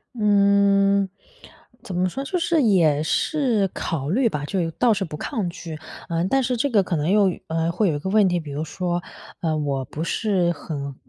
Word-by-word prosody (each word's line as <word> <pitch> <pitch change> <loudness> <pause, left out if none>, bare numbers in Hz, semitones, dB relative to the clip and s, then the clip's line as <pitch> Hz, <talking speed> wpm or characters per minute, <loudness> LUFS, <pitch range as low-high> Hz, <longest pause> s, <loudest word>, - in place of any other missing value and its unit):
嗯， 200 -2 +3 0.8
怎 185 - -6
么 180 +1 +1
说， 270 +9 -5
就 360 +5 -2
是 330 -3 +2
也 165 -9 +3
是 230 - +1
考 145 -5 -3
虑 240 +8 +2
吧， 150 -9 -3
就 190 +5 -2
有 165 -2 -1
倒 240 +8 +2
是 195 -3 0
不 155 - -7
抗 210 - -3
拒。 165 -2 -8 0.3
呃， 165 +1 0
但 270 +8 +2
是 250 -1 -1
这 285 - +1
个 210 -4 +4
可 180 - -2
能 155 +4 0
又， 200 -3 +4 0.2
呃， 165 +1 0
会 190 +3 +1
有 155 - 0
一 145 - -3
个 190 - -4
问 205 0 +4
题， 180 -1 +1
比 155 -3 -8
如 145 +2 -3
说， 175 +1 -3 0.4
呃， 160 -2 0
我 140 -3 -2
不 155 - -5
是 180 -1 +1
很 140 -4 -6
185 Hz, 220 characters per minute, -23 LUFS, 160-210 Hz, 0.8 s, 个